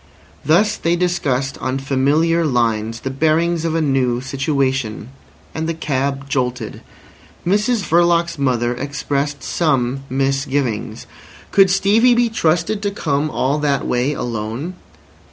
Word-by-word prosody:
Thus 205 +7 +3
they 170 +1 +1
discussed 140 -7 -1
on 130 +1 -2
familiar 145 +5 +1
lines 115 -5 0
the 135 - -3
bearings 160 +4 +1
of 165 -1 -1
a 165 - +1
new 130 -4 +1
situation. 135 -4 -1 0.4
And 160 +1 -3
the 165 - -2
cab 140 -2 -2
jolted. 125 -2 -2 0.6
Mrs 210 +4 +1
Verloc's 170 -1 +2
mother 120 -3 +1
expressed 140 +1 -3
some 135 -6 0
misgivings. 135 -3 -1 0.5
Could 195 -1 +5
Stevie 210 +6 +4
be 240 -1 +2
trusted 200 +1 0
to 205 - 0
come 155 -6 -1
all 140 +1 0
that 140 -2 0
way 125 +4 0
alone? 120 +6 -4
140 Hz, 125 wpm, -19 LUFS, 130-170 Hz, 0.6 s, Could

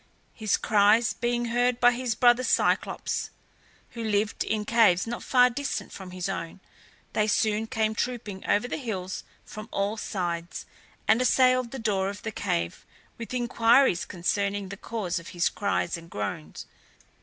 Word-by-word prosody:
His 215 -3 0
cries 215 +2 +4
being 240 0 -1
heard 245 0 +2
by 245 0 +6
his 245 -2 -2
brother 240 +2 +4
Cyclops, - - 0 0.6
who 230 - -6
lived 210 -1 0
in 215 -1 -2
caves 215 -6 +4
not 235 +1 -5
far 250 -1 +5
distant 285 +3 -4
from 190 -2 -9
his 180 0 -4
own, 180 -2 -5 0.5
they 215 - +1
soon 215 0 +1
came 220 -1 0
trooping 220 -4 -4
over 220 +4 +2
the - - -3
hills 190 -8 -4 0.2
from 215 +1 -9
all 200 +2 -1
sides, 175 -4 -4 0.4
and 220 +3 +4
assailed 255 -1 +3
the 270 - -7
door 200 -5 0
of 205 +1 -8
the 220 - -3
cave 85 - -2 0.4
with 230 - -7
inquiries 240 -4 +3
concerning 200 +2 -1
the 200 - -6
cause 200 -4 -3
of 170 - -12
his 175 - +3
cries 200 -4 -1
and 170 0 -13
groans. 100 - -5
215 Hz, 155 wpm, -27 LUFS, 190-240 Hz, 0.6 s, by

